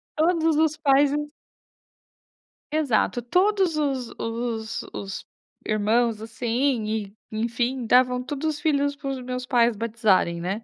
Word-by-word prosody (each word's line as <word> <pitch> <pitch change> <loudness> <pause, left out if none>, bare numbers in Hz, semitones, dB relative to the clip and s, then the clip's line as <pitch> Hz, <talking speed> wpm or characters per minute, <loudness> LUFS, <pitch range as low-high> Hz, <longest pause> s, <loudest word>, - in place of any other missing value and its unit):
Todos 325 -1 +2
os 310 -1 +2
pais 280 -2 +4
e - - 0
os 295 0 -3 1.4
Exato, 265 -5 +1
todos 370 - +2
os 270 -5 -1
os 230 -1 -3
os 195 -1 -6 0.4
irmãos 215 +1 +1
assim 235 +2 -1
e, 215 -2 -3 0.2
enfim, 235 +3 -1
davam 250 +1 +4
todos 290 +3 -3
os - - -8
filhos 285 -3 +1
para 280 -1 -6
os 265 -1 -4
meus 250 0 -4
pais 240 -3 +3
batizarem, 210 -6 +1
né. 195 +6 -3
250 Hz, 135 wpm, -24 LUFS, 225-290 Hz, 1.4 s, pais